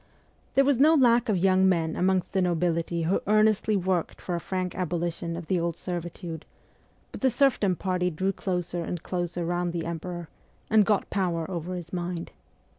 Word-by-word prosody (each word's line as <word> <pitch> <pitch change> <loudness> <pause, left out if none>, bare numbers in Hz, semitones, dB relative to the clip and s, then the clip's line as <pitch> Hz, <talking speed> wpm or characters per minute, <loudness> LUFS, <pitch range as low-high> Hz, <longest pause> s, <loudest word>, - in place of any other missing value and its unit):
There 275 - +5
was 275 -3 +3
no 310 +4 +6
lack 240 -4 +4
of 205 - +2
young 190 +1 +4
men 165 -3 +1
amongst 185 0 +1
the 190 - +2
nobility 170 -1 0
who 175 +4 +1
earnestly 215 0 +3
worked 185 -2 -1
for 180 - -4
a 170 - 0
frank 185 +1 -3
abolition 170 -1 -2
of 170 - -6
the 185 +1 +1
old 170 -1 -2
servitude; 175 -2 -5 0.7
but - - -9
the 265 - +4
serfdom 240 -7 +2
party 180 0 0
drew 185 +4 -1
closer 180 -3 -2
and 170 0 -5
closer 175 -1 -3
round 175 0 -1
the 170 -1 -3
emperor, 170 +1 -5 0.4
and 215 -2 +5
got 210 -2 +1
power 175 -4 0
over 175 +1 -4
his 175 -1 -8
mind. 175 -1 -4
180 Hz, 180 wpm, -27 LUFS, 170-195 Hz, 0.7 s, no